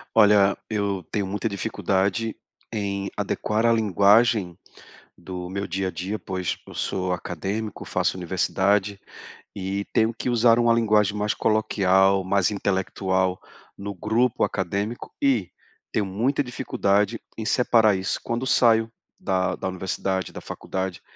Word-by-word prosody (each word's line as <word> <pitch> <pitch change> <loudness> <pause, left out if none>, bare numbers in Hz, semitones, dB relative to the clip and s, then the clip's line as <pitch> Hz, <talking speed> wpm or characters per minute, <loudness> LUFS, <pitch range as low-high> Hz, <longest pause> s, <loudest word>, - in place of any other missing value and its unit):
Olha, 100 -2 +5
eu 100 -3 -1
tenho 100 -2 0
muita 105 +4 -2
dificuldade 100 +2 -1 0.4
em 100 -2 -2
adequar 105 +2 -1
a 115 - +5
linguagem 105 -2 +3 0.6
do 90 0 -7
meu 100 +2 -3
dia 95 +1 -2
a - - -3
dia, 95 +5 -4
pois 95 -2 -3
eu - - -11
sou 90 -1 -2
acadêmico, 95 +5 -4
faço - - 0
universidade, 95 +2 0 0.6
e 100 +1 -3
tenho 110 +1 +2
que 115 - -3
usar 120 -1 +4
uma 120 -1 +4
linguagem 105 -3 +2
mais 105 0 0
coloquial, 95 -3 +2
mais 100 +1 +2
intelectual, 95 -1 0 0.4
no 100 +1 -5
grupo 110 +5 +1
acadêmico, 100 +4 -2
e 125 -10 +2 0.4
tenho 105 - 0
muita 115 +10 0
dificuldade 105 -3 0 0.2
em 110 - -4
separar 115 -5 +4
isso. 95 0 -1
Quando 120 +2 -2
saio 115 -2 +4 0.3
da 95 -1 0
da - - -3
universidade, 95 0 -2
da - - -7
faculdade, 95 -2 -5
100 Hz, 135 wpm, -24 LUFS, 95-110 Hz, 0.6 s, Olha